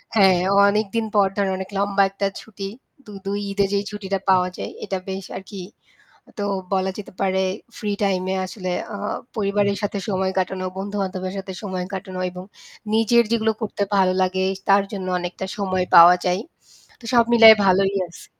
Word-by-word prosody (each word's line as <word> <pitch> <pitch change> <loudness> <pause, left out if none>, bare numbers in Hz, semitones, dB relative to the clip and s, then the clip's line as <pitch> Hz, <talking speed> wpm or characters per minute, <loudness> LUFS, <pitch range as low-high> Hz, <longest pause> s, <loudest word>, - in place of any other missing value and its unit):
হ্যাঁ, 190 -4 +5 0.3
অনেকদিন 215 +2 0
পর 200 -1 +5
ধরে 200 -1 +1
অনেক 190 0 -6
লম্বা 200 0 +2
একটা 195 +1 -2
ছুটি, 200 -3 -8 0.4
দু 210 - -12
২ 200 +1 -2
ঈদে 200 0 +1
যেই 200 0 0
ছুটিটা 195 -2 -3
পাওয়া 185 -1 +4
যায় - - -5
এটা 190 - -2
বেশ 190 0 -5
আরকি। 195 0 -9 0.8
তো 205 - -2 0.3
বলা 190 0 +1
যেতে 210 - -9
পারে 190 -1 +1 0.3
ফ্রি 210 -3 -3
টাইম 190 -2 +1
এ - - -1
আসলে 185 -1 -5 0.2
আ - - -4 0.4
পরিবারের 200 -1 0
সাথে 205 0 -2
সময় 190 -1 0
কাটানো, 185 0 -2
বন্ধু-বান্ধবের 190 -1 -3
সাথে 190 0 -6
সময় 185 -3 -3
কাটানো 185 -1 -6
এবং 180 0 -8 0.5
নিজের 225 +2 +4
যেগুলো 220 -1 +2
করতে 205 -2 -2
ভালো 190 -2 +3
লাগে 185 0 +1 0.3
তার 195 0 +6
জন্য 190 -2 -4
অনেকটা 180 +2 -5
সময় 185 -2 -1
পাওয়া 170 +1 +10
যায়। 180 +2 +1 0.6
তো - - -18
সব 235 -1 +6
মিলায় 225 -1 +10
ভালোই 195 +1 +3
আছি। 170 - -14
195 Hz, 170 wpm, -22 LUFS, 185-205 Hz, 0.8 s, পাওয়া